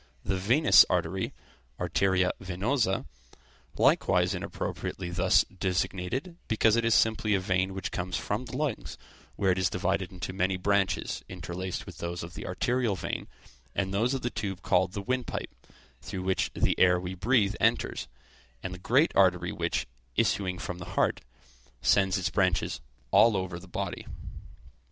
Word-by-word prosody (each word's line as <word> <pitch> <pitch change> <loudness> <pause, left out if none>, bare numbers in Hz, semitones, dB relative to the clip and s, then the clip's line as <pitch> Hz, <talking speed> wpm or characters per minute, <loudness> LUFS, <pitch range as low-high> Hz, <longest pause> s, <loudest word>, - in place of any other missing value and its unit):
the 95 - 0
venous 115 +12 +6
artery - - 0 0.5
(arteria 90 +1 +2
venosa), 95 - 0 0.7
likewise - - +3
inappropriately 90 -2 -4
thus 85 0 +4
designated, 95 - -2
because 110 0 +3
it 115 - +2
is 115 -1 +3
simply 110 -1 +3
a - - +2
vein 95 0 0
which 95 - -4
comes 90 +1 -2
from 105 +5 -2
the 125 +2 -6
lungs, 150 0 -3 0.4
where 95 -2 +2
it 90 - 0
is 90 -1 +2
divided 95 +1 -1
into 95 0 -6
many 95 0 0
branches, 95 0 0
interlaced 90 0 -5
with - - -11
those 85 +1 -4
of 85 +1 -8
the 80 - -7
arterial 120 +3 0
vein, - - -4 0.5
and 95 -1 -1
those 120 +7 +1
of 130 - -4
the 120 - -1
tube 100 -4 -4
called 95 0 +2
the 100 -2 -4
windpipe, 125 +2 -3 0.5
through 95 - -5
which 95 0 0
the - - +1
air 90 -1 +5
we 90 +1 -5
breathe 105 +1 +2
enters; - - +1 0.6
and 90 - -4
the 90 - -8
great 130 - +3
artery 90 -2 +3
which, - - -1 0.3
issuing 90 -2 +1
from 90 0 -5
the 90 - -8
heart, - - +2 0.6
sends 95 0 +3
its 95 0 -1
branches 95 -4 +1 0.3
all 115 -3 +6
over 95 -2 -3
the 95 - -13
body. - - -4
95 Hz, 155 wpm, -28 LUFS, 90-110 Hz, 0.7 s, venous